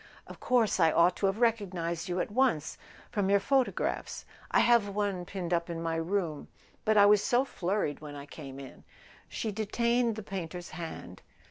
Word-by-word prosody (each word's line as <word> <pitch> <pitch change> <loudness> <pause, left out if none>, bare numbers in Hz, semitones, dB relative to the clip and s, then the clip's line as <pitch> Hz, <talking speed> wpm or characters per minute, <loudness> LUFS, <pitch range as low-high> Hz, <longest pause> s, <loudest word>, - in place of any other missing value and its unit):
"Of - - -12
course 240 -6 +2
I 165 -2 +5
ought 175 +3 +4
to 200 - +1
have 195 +1 -1
recognised 185 -7 0
you 180 +1 -1
at - - -2
once—from 205 - -1
your 200 0 +5
photo¬ 265 +3 +1
graphs. - - -3 0.2
I - - +4
have 235 -3 +4
one 200 -3 -2
pinned 180 -2 -4
up 170 0 0
in 170 -1 -4
my 165 0 -2
room. 165 -2 -2 0.4
But 215 0 +3
I 200 - +8
was 205 0 +5
so 250 +2 +2
flurried 185 - -2
when 150 -1 -8
I 140 0 -8
came 140 -2 -9
in." 135 -1 -11 0.5
She 220 - -3
detained 235 +2 0
the 215 - -6
painter's 180 -2 -6
hand. 165 -2 -8
195 Hz, 185 wpm, -30 LUFS, 165-215 Hz, 0.5 s, I